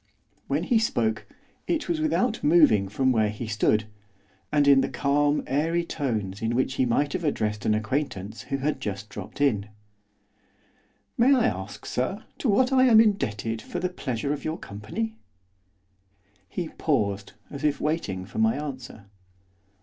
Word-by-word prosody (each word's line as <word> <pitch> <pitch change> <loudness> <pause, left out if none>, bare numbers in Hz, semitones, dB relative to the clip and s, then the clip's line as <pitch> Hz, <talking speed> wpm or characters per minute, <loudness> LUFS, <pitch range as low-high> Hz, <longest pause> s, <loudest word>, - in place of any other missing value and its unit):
When - - 0
he 235 -3 +3
spoke, 110 - 0 0.4
it 335 -1 -1
was 335 -2 -1
without 250 -7 0
moving 145 - +5
from 130 +5 +2
where 110 -3 +2
he 105 +3 -5
stood, 110 0 +2 0.7
and 145 -1 +3
in 140 -1 +7
the - - -1
calm, 145 +1 +1
airy 165 +5 0
tones 110 - -3
in 115 +1 0
which 130 +1 +1
he 130 -1 +1
might 145 +5 +1
have 175 - -2
addressed 105 -8 -1
an 110 - +3
acquaintance 110 -3 -3
who 135 - 0
had 145 +3 -2
just 100 +1 -4
dropped 105 - -9
in. 105 -8 +1 1.5
'May 265 +4 +6
I 245 -3 +3
ask, - - -3
sir, - - -2 0.2
to 260 - 0
what 255 +6 +3
I 260 0 +6
am 230 -4 +7
indebted 115 - +1
for - - -6
the 180 +1 -1
pleasure 140 -5 -3
of 145 - -6
your 155 +1 -2
company?' 165 - -5 1.3
He 175 -3 -4
paused, 100 -10 -1 0.2
as 140 0 -7
if 150 -1 +1
waiting 105 - -2
for 100 - -6
my 110 0 +3
answer. 130 -7 -7
140 Hz, 160 wpm, -26 LUFS, 110-165 Hz, 1.5 s, in